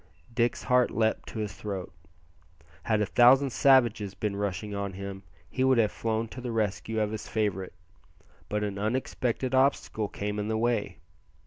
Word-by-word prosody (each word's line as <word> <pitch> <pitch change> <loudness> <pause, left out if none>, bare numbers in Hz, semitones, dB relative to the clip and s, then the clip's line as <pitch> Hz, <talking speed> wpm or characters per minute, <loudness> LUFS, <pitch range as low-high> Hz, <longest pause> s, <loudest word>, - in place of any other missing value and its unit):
Dick's 120 0 0
heart 125 -1 +3
leaped 110 -1 0
to - - -8
his 105 -1 -3
throat. 95 -4 -6 0.9
Had 110 -2 +2
a - - +2
thousand 130 +5 +5
savages 120 -7 +3
been 105 -2 -2
rushing 100 0 -3
on 100 -1 -3
him 100 0 -6 0.3
he 130 +8 -1
would 130 -1 +4
have 110 -3 +3
flown 115 0 -2
to 125 - -8
the 120 -1 -4
rescue 110 0 -1
of 105 -1 0
his 110 - -5
favourite; 100 -4 -2 0.8
but 105 0 -1
an 100 -1 -3
unexpected 125 +3 -1
obstacle 130 -5 +2
came 105 +1 -4
in 105 - -2
the 110 0 0
way. 115 -2 0
110 Hz, 165 wpm, -28 LUFS, 105-120 Hz, 0.9 s, thousand